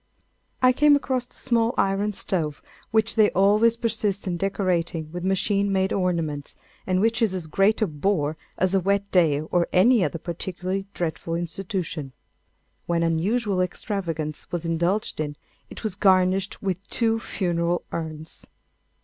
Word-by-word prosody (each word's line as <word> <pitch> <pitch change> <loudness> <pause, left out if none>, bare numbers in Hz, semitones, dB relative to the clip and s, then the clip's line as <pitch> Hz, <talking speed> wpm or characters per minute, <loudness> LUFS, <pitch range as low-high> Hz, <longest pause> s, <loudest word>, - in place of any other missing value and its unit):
I 255 - +7
came 295 +2 +5
across 260 -3 -1
the - - -22
small 235 -2 +1
iron 195 +2 +1
stove 160 -6 -2 0.3
which 220 0 +2
they 215 -2 +5
always 210 +4 +4
persist 210 -4 -1
in 180 -2 -1
decorating 175 -4 -1
with 175 +1 -5
machine 200 +1 +1
made 190 0 +1
ornaments, 165 -6 -1 0.3
and 185 -1 +2
which 225 +1 +1
is 210 -5 +2
as 180 -3 -3
great 195 +7 +2
a - - +4
bore 155 -1 0 0.2
as 185 +1 +1
a 195 - +4
wet 200 +2 0
day 160 -6 +3
or 170 +2 0
any 220 +3 +5
other 170 - -1
particularly 185 +3 -4
dreadful 165 -1 -2
institution. 170 -4 -4 0.7
When 170 -1 +1
unusual 190 +5 +1
extravagance 165 -5 -3
was 175 -1 -3
indulged 170 +5 0
in, 145 -1 -2 0.3
it - - -10
was 215 -3 -2
garnished 185 0 +2
with 190 -3 0
two 225 -1 +1
funeral 175 -4 -1
urns. 160 -1 -6
185 Hz, 150 wpm, -24 LUFS, 170-205 Hz, 0.7 s, I